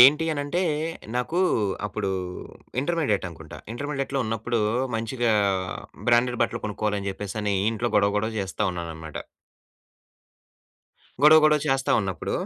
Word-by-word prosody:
ఏంటి 145 Hz, +6 st, +8 dB
అనంటే 145 Hz, +4 st, -1 dB, 0.5 s
నాకు 125 Hz, +8 st, -1 dB, 0.5 s
అప్పుడు 105 Hz, -1 st, -3 dB, 0.7 s
ఇంటర్మీడియేట్ 145 Hz, -, 0 dB
అనుకుంటా. 85 Hz, -, -11 dB
ఇంటర్మీడియేట్‌లో 135 Hz, +1 st, -3 dB
ఉన్నప్పుడు 115 Hz, +2 st, -1 dB, 0.4 s
మంచిగా 115 Hz, +1 st, 0 dB, 0.8 s
బ్రాండెడ్ 120 Hz, +1 st, +3 dB
బట్టలు -, -, -2 dB
కొనుక్కోవాలని 105 Hz, -1 st, -2 dB
జెప్పేసనీ 100 Hz, +1 st, -3 dB, 0.2 s
ఇంట్లో 115 Hz, +2 st, -1 dB
గొడవ, 100 Hz, 0 st, +3 dB
గొడవ 110 Hz, +2 st, -2 dB
చేస్తా 95 Hz, +2 st, -3 dB
ఉన్నానన్నమాట. 80 Hz, -3 st, -6 dB, 2.1 s
గొడవ, 155 Hz, +1 st, +9 dB
గొడవ 150 Hz, 0 st, +5 dB
చేస్తా 135 Hz, 0 st, +1 dB
ఉన్నప్పుడు 95 Hz, -3 st, -3 dB
115 Hz, 105 wpm, -25 LUFS, 100-135 Hz, 2.1 s, గొడవ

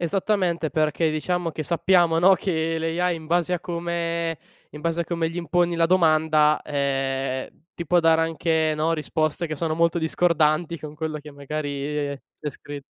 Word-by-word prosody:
Esattamente, 175 Hz, -2 st, 0 dB
perché 155 Hz, +1 st, +1 dB
diciamo 170 Hz, +2 st, -1 dB
che 155 Hz, 0 st, -5 dB
sappiamo 170 Hz, 0 st, +3 dB
no, 190 Hz, +2 st, +7 dB
che 165 Hz, -4 st, -1 dB
l' 165 Hz, +1 st, -2 dB
AI, 180 Hz, -1 st, +1 dB
in 160 Hz, -1 st, -10 dB
base 175 Hz, +2 st, +1 dB
a 180 Hz, -, +1 dB
come 170 Hz, -2 st, -2 dB, 0.3 s
in 150 Hz, -, -10 dB
base 165 Hz, +1 st, -1 dB
a -, -, 0 dB
come 165 Hz, -1 st, -1 dB
gli 165 Hz, -, -9 dB
imponi 175 Hz, 0 st, +1 dB
la 165 Hz, 0 st, +3 dB
domanda, 155 Hz, -3 st, +3 dB
ehm, 135 Hz, -2 st, -1 dB, 0.3 s
ti 170 Hz, -, -5 dB
può 175 Hz, +2 st, +3 dB
dare 165 Hz, -1 st, +4 dB
anche 160 Hz, -1 st, +1 dB
no, 155 Hz, +2 st, +1 dB
risposte 155 Hz, +1 st, -1 dB
che 155 Hz, -, -4 dB
sono 155 Hz, +1 st, -1 dB
molto 170 Hz, +1 st, +2 dB
discordanti 160 Hz, 0 st, +1 dB
con 150 Hz, -1 st, -8 dB
quello 155 Hz, 0 st, -4 dB
che 150 Hz, 0 st, -11 dB
magari 145 Hz, 0 st, -3 dB, 0.2 s
c'è 150 Hz, -, -4 dB
scritto. 145 Hz, 0 st, -9 dB
160 Hz, 175 wpm, -24 LUFS, 150-170 Hz, 0.3 s, no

